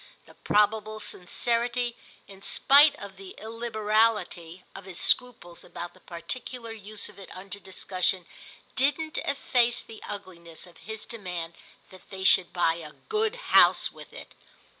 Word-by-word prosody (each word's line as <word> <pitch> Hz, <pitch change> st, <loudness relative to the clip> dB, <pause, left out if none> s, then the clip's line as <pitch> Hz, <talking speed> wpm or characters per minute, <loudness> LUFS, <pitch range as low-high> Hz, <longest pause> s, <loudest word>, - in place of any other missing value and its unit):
The -, -, -16 dB
probable 215 Hz, +1 st, +2 dB
sincerity, 235 Hz, +6 st, 0 dB, 0.3 s
in 195 Hz, -1 st, -13 dB
spite 285 Hz, +7 st, +6 dB
of 200 Hz, -1 st, -10 dB
the 195 Hz, -1 st, -10 dB
illiberality, 215 Hz, -5 st, 0 dB
of 195 Hz, -1 st, -10 dB
his 185 Hz, -3 st, -5 dB
scruples 240 Hz, -9 st, +1 dB
about 175 Hz, 0 st, -7 dB
the -, -, -20 dB
particular 230 Hz, +7 st, -6 dB
use 215 Hz, -1 st, -7 dB
of 205 Hz, -1 st, -14 dB
it 195 Hz, -, -11 dB
under 200 Hz, +2 st, -8 dB
discussion 185 Hz, -1 st, -1 dB, 0.5 s
didn't 310 Hz, +4 st, +1 dB
efface 250 Hz, -3 st, +1 dB
the 225 Hz, -, -12 dB
ugliness 185 Hz, -5 st, -8 dB
of 175 Hz, -2 st, -17 dB
his 220 Hz, -1 st, -5 dB
demand 180 Hz, -7 st, -6 dB, 0.4 s
that 185 Hz, -1 st, -16 dB
they 190 Hz, -1 st, -6 dB
should 190 Hz, -1 st, +5 dB
buy 165 Hz, -2 st, +2 dB
a 155 Hz, -3 st, -9 dB
good 440 Hz, +1 st, -1 dB, 0.2 s
house -, -, +6 dB
with -, -, -13 dB
it. -, -, -11 dB
210 Hz, 140 wpm, -28 LUFS, 185-235 Hz, 0.5 s, spite